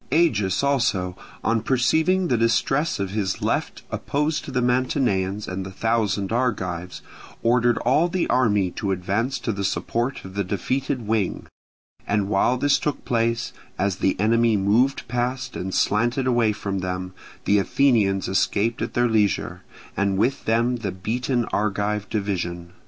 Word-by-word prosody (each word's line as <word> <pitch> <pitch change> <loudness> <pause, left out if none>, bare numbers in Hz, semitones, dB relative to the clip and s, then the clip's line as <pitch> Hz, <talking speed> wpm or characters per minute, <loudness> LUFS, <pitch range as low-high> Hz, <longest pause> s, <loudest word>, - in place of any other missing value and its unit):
Agis 125 - +2
also 110 -10 +1 0.3
on 115 -1 +1
perceiving 160 - +2
the 125 - +2
distress 115 +7 +1
of 100 -1 -2
his 100 -3 -1
left - - -2
opposed 150 +2 -1
to - - -8
the 130 -2 -1
Mantineans 120 -6 0
and 95 +1 -4
the 95 - -7
thousand 105 -1 0
Argives, 90 -8 -2 0.4
ordered 120 0 +3
all 150 +8 +4
the 180 0 -1
army 105 -7 +2
to 100 - -4
advance 100 +8 -1
to 115 - -2
the 100 -1 -3
support 120 +6 -2
of 95 - -9
the 100 +1 -1
defeated 130 +7 -2
wing; 105 -3 -1 0.6
and 100 -1 0
while 110 +5 +2
this 140 +2 +3
took 150 -2 -3
place, 115 0 0 0.2
as 95 -1 0
the 95 - 0
enemy 115 +1 +3
moved 110 +8 +2
past 125 +2 -2
and 95 - -4
slanted 120 +7 +1
away 120 -4 +3
from 100 -2 -3
them, 90 0 -4 0.3
the 100 0 +4
Athenians 100 -5 +2
escaped 105 +4 0
at - - -3
their 120 0 +3
leisure, 110 -3 0 0.3
and 100 -1 +1
with 125 +7 0
them 115 +2 +2
the 105 -5 -3
beaten 120 +6 -1
Argive 105 0 -1
division. 90 -5 -3
110 Hz, 150 wpm, -23 LUFS, 95-125 Hz, 0.6 s, all